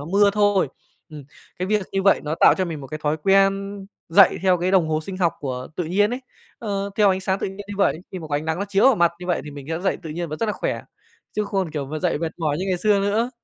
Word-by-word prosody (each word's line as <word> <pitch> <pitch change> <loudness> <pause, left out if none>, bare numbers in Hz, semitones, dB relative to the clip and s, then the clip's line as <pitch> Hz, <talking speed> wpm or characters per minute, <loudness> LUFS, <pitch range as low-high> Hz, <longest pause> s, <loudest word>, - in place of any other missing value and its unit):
nó - - -6
mưa 200 +4 +4
thôi. 205 -5 +2 0.4
Ừm, 150 -2 -9 0.3
cái 180 - -2
việc 210 0 +1
như 195 - 0
vậy 195 0 +4
nó 150 +1 -1
tạo - - +7
cho 185 - +2
mình 160 -4 -5
một 135 - -8
cái 155 +4 -6
thói 150 +1 +1
quen 195 +3 +2 0.3
dậy 185 +3 +6
theo 185 -2 +3
cái 180 +2 0
đồng 185 -4 +3
hồ 155 0 0
sinh 185 +4 -7
học 175 -3 +2
của 130 -2 -4
tự 180 - -1
nhiên 200 +6 +2
ấy, 250 +2 -3 0.4
ơ, 200 -3 -3
theo 210 -2 +5
ánh 190 0 0
sáng 190 0 -1
tự - - -1
nhiên 190 - -10
như 205 - -5
vậy, 195 -4 +1
khi 185 - -4
mà 165 - -8
có 145 - -2
ánh 150 - -4
nắng 160 +1 -2
nó 200 - -1
chiếu 200 0 +2
vào 270 - +7
mặt 170 -1 +3
như 180 - -7
vậy 175 - 0
thì 150 - -8
mình 140 -2 -10
sẽ 165 +1 -2
dậy 190 - 0
tự 160 - -7
nhiên 170 +1 -4
và 155 - -5
rất 230 - +1
là 210 - 0
khỏe. - - -3 0.5
Chứ 210 - -1
không, 195 -4 -2
kiểu, 145 -3 -4
mà 155 +3 -4
dậy 150 - 0
mệt 165 0 -3
mỏi 155 -4 0
như 185 - -2
ngày 185 -1 0
xưa 205 +1 +3
nữa. 215 +5 0
185 Hz, 300 wpm, -22 LUFS, 160-200 Hz, 0.5 s, tạo